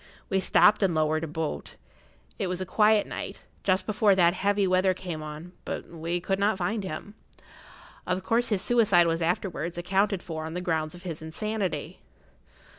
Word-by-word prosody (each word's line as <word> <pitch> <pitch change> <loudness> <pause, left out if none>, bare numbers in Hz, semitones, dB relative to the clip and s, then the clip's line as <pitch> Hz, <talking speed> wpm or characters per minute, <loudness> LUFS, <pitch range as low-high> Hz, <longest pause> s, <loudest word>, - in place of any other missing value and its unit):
We 195 - +3
stopped 210 +2 +5
and 185 -4 +2
lowered 155 0 +1
a - - -2
boat; 160 0 -4 0.6
it - - 0
was 180 0 -2
a 185 - -3
quiet 210 +2 +4
night, - - -7 0.2
just 185 -1 +2
before 210 -1 +3
that 175 -2 +5
heavy 200 +1 +1
weather 185 0 +3
came 175 -4 -5
on; 155 +3 -8
but - - -5
we 170 +1 -2
could 195 +2 -1
not 205 0 +2
find 205 +3 -1
him. 190 +3 -6 0.9
Of 185 +1 -1
course 230 +4 +1
his 200 -4 0
suicide 210 -8 +4
was 165 0 0
afterwards 170 0 -1
accounted 195 +2 +1
for 160 -2 -5
on 160 +1 -6
the - - -1
ground 160 -2 -1
of 175 - -13
his 165 -4 -5
insanity." 185 -1 -3
185 Hz, 180 wpm, -27 LUFS, 165-200 Hz, 0.9 s, stopped